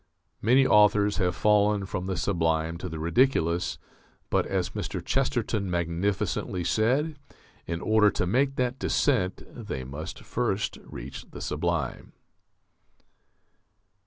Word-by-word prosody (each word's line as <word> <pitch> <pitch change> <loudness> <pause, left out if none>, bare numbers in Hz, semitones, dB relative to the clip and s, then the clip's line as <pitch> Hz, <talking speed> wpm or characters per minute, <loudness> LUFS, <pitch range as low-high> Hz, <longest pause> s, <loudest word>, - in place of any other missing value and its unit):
Many 130 +5 +5
authors 105 -2 +4
have 90 -3 +1
fallen 105 -1 +3
from 95 -1 -4
the 95 -2 -2
sublime 80 -3 0
to 90 - -5
the 80 - -6
ridiculous; 85 0 +1 0.5
but, - - +2
as - - -1
Mr. - - -4
Chesterton 120 -7 0
magnificently 90 +1 -1
said, 135 - +1 0.5
in 85 0 -3
order 110 -1 +4
to 90 - -1
make 135 +8 +1
that 125 0 -1
descent 95 -10 +1
they 105 - -5
must 70 +5 -7
first 105 -4 -1
reach 65 +3 -9
the - - -9
sublime. - - -2
100 Hz, 120 wpm, -27 LUFS, 85-115 Hz, 0.5 s, Many